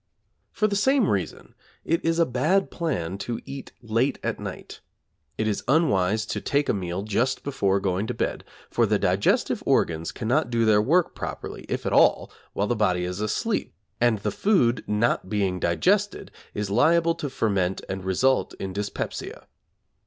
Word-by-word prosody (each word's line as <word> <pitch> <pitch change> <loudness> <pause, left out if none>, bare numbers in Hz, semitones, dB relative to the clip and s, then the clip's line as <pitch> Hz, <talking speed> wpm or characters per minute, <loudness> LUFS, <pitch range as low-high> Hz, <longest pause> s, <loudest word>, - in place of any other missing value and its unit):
For 215 - 0
the 200 - -1
same 265 +2 +3
reason 95 -5 -3 0.3
it 165 +1 0
is 165 0 +1
a 170 - +4
bad 155 +10 +1
plan 100 - -3
to 120 +2 -3
eat 135 -1 -8
late 115 +4 +1
at - - -2
night. - - -8 0.6
It 110 - 0
is 105 - -1
unwise 110 - +2
to - - -4
take 145 0 0
a - - +2
meal 90 -1 -3
just 115 +5 0
before 100 -9 +1
going 95 +2 -1
to - - -3
bed, - - -2 0.3
for - - +2
the - - +2
digestive - - +1
organs 80 0 +1
cannot 125 +4 0
do 115 -1 +1
their 105 -1 +5
work 165 +9 +2
properly, - - -6
if - - -3
at - - -1
all, - - +4 0.2
while 100 - 0
the 120 - 0
body 95 -5 +1
is 90 +3 -4
asleep, 105 - -1 0.2
and 120 -2 +3
the 105 +1 -2
food 125 - +2
not 105 -2 +1
being 95 -3 0
digested 190 - +1 0.2
is 105 -1 -3
liable 165 +9 +4
to 155 -3 -5
ferment 100 -7 0
and 95 0 -4
result 125 +8 +1
in 95 -1 -5
dyspepsia. 105 +1 -5
110 Hz, 170 wpm, -25 LUFS, 95-145 Hz, 0.6 s, their